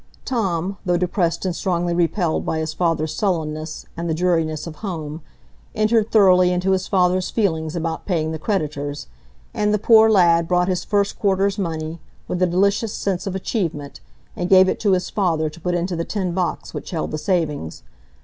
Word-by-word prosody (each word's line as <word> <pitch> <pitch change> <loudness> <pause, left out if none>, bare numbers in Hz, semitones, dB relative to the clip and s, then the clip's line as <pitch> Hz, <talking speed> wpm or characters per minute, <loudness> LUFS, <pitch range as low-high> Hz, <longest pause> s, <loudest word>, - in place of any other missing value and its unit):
Tom, 195 -6 -1
though 180 -3 +1
depressed 175 0 0
and 180 -2 -1
strongly 175 -2 -1
repelled 170 0 0
by 160 - -2
his 160 0 -2
father's 160 -2 0
sullenness, 155 -5 -2
and 170 0 -4
the 160 - 0
dreariness 165 -3 0
of 165 -2 -8
home, 160 -6 -5 0.5
entered 215 0 +2
thoroughly 185 -4 +5
into 180 +2 0
his 190 0 0
father's 185 -1 +2
feelings 160 -7 -1
about 165 -1 -3
paying 160 -5 0
the 160 - -4
creditors; 150 -6 -2 0.5
and 210 0 +1
the 210 - +3
poor 220 +1 +6
lad 170 -5 +4
brought 180 0 +2
his 185 -2 -1
first 200 -1 0
quarter's 195 0 +1
money, 160 -2 -3 0.3
with 180 - -3
a 185 - +4
delicious 200 +5 +1
sense 195 0 -2
of 190 - -3
achievement, 165 - -3 0.4
and 175 0 -3
gave 190 -1 +7
it - - -1
to 205 -3 +2
his 180 -1 -1
father 160 -6 0
to 165 +2 -14
put 180 +1 -1
into 175 +1 -1
the 165 - -2
tin 190 -1 -2
box 180 0 -2
which - - -6
held 165 -3 -3
the 155 - -3
savings. 150 - -2
180 Hz, 185 wpm, -21 LUFS, 160-195 Hz, 0.5 s, gave